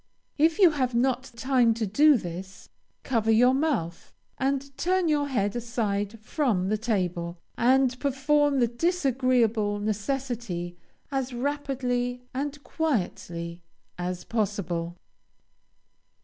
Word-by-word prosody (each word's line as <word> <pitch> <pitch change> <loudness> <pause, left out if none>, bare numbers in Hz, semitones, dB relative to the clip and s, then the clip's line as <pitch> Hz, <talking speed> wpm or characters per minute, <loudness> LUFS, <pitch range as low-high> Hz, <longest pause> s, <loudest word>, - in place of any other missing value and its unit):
If 320 +2 +4
you 370 -5 +7
have 255 -5 -1
not 255 +1 +1
time 245 -2 +3
to 225 -1 -1
do 285 +8 +5
this, 185 0 -8 0.3
cover 225 -4 0
your 245 +3 +5
mouth, 265 - -2 0.2
and 275 0 -1
turn 365 +2 +1
your 290 -2 +2
head 205 -6 0
aside 225 -3 -2
from 215 - 0
the 215 - +1
table, 180 -6 -1 0.2
and 255 +1 +3
perform 285 +1 +2
the 240 - +4
disagreeable 245 - +1
necessity 215 -4 -3 0.4
as 265 -2 -2
rapidly 250 -2 -2
and 285 +2 -4
quietly 175 - -2 0.3
as 180 0 -4
possible. 180 -6 -2
245 Hz, 110 wpm, -27 LUFS, 205-275 Hz, 0.4 s, you